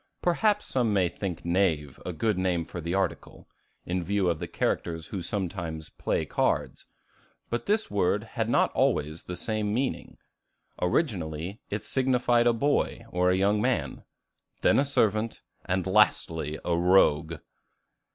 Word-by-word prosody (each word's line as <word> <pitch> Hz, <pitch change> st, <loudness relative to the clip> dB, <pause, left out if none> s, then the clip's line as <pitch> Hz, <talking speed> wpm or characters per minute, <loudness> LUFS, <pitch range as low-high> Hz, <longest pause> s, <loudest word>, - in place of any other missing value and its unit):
Perhaps 210 Hz, +4 st, +2 dB
some 120 Hz, -5 st, 0 dB
may 95 Hz, -3 st, +3 dB
think 90 Hz, 0 st, -5 dB
Knave 85 Hz, -6 st, 0 dB
a 90 Hz, -, -4 dB
good 105 Hz, +6 st, 0 dB
name 90 Hz, -2 st, 0 dB
for 85 Hz, -, -7 dB
the 85 Hz, +3 st, -2 dB
article, 95 Hz, 0 st, -3 dB, 0.4 s
in 90 Hz, +1 st, -1 dB
view 95 Hz, -1 st, +1 dB
of 80 Hz, -, -4 dB
the -, -, -4 dB
characters 80 Hz, -1 st, -2 dB
who 95 Hz, -, -4 dB
sometimes 85 Hz, -4 st, -4 dB
"play -, -, -1 dB
cards." -, -, -1 dB, 0.6 s
But 120 Hz, -, -2 dB
this 215 Hz, +2 st, +1 dB
word 100 Hz, +1 st, +1 dB
had 115 Hz, 0 st, -3 dB
not -, -, +3 dB
always 75 Hz, +3 st, 0 dB
the 90 Hz, -, -6 dB
same 110 Hz, -2 st, -2 dB
meaning. 130 Hz, +4 st, -2 dB, 0.6 s
Originally, 90 Hz, -, -1 dB
it 105 Hz, +1 st, -4 dB
signified 125 Hz, -2 st, +2 dB
a -, -, +6 dB
boy 140 Hz, -2 st, 0 dB
or 90 Hz, -2 st, +2 dB
young 100 Hz, +3 st, +2 dB
man, -, -, -1 dB, 0.6 s
then -, -, +4 dB
a 140 Hz, -, +3 dB
servant, 110 Hz, -5 st, 0 dB, 0.2 s
and 90 Hz, 0 st, 0 dB
lastly 80 Hz, -6 st, +2 dB
a 85 Hz, -, +1 dB
rogue. 85 Hz, -3 st, +3 dB
95 Hz, 145 wpm, -27 LUFS, 85-110 Hz, 0.6 s, a